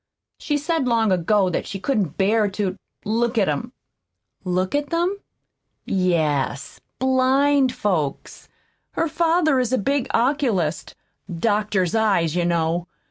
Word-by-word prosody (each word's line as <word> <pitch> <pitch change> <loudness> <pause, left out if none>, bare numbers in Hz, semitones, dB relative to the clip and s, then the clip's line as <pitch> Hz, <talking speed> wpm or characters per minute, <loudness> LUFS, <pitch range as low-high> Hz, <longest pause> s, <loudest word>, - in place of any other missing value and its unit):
She 295 -2 -1
said 305 -2 -1
long 225 -3 +2
ago 185 +2 +2
that - - -3
she 195 - -5
couldn't 195 - -1
bear 210 +2 +2
to 195 -3 -1 0.3
look 230 +3 0
at 200 - +3
'em." 155 - -2 0.7
"Look 185 0 -1
at 290 0 -1
them?" 350 +4 0 0.7
"Yes 155 -7 -1 0.2
blind 265 +1 +3
folks. 165 -9 -3 0.4
Her 330 - 0
father 325 -3 +2
is 250 -2 -1
a 260 - +2
big 275 +4 0
oculist 230 - 0 0.4
doctors 205 -2 0
eyes, 195 -8 +1
you 175 -1 +1
know. 170 0 0
215 Hz, 130 wpm, -22 LUFS, 180-265 Hz, 0.7 s, at